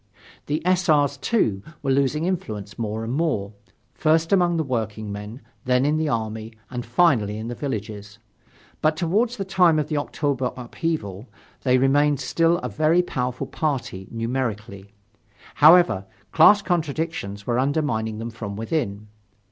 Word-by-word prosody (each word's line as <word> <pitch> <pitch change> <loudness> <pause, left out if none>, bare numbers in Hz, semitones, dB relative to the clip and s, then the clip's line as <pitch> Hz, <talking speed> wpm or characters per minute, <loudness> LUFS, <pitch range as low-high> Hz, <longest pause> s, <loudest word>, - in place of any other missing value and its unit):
The 150 +3 -2
S. 185 -1 +2
R.'s, 145 -2 +3
too, 130 - 0 0.2
were 135 - +1
losing 140 +4 +1
influence 110 - -4
more 110 0 -3
and 115 +2 -3
more 135 -10 -1 0.4
first 160 +2 +2
among 175 -3 +3
the 160 - +1
workingmen, 110 -2 -4 0.2
then 125 +1 +2
in 150 +2 +2
the 155 -1 0
army, 110 -1 -3 0.2
and 125 -1 -4
finally 120 -5 +2
in 110 +2 -5
the - - -3
villages. 105 -5 -5 0.6
But 155 0 +2
toward 195 +9 +1
the 215 -5 -5
time 180 -4 +4
of 150 -1 -1
the 155 - -1
October 140 -3 -1
upheaval, 120 - -4 0.3
they 130 -1 +3
remained 145 +2 +3
still 165 +6 +2
a - - -1
very 155 - +2
powerful 125 -6 -3
party, 125 -11 -3
numerically. 110 -4 -4 0.6
However, 155 - +5 0.2
class 205 -1 +6
contradictions 160 - -2
were 120 0 0
undermining 130 -6 0
them 115 +1 -5
from 105 -3 -6
within. 110 -3 -3
130 Hz, 145 wpm, -23 LUFS, 110-160 Hz, 0.6 s, class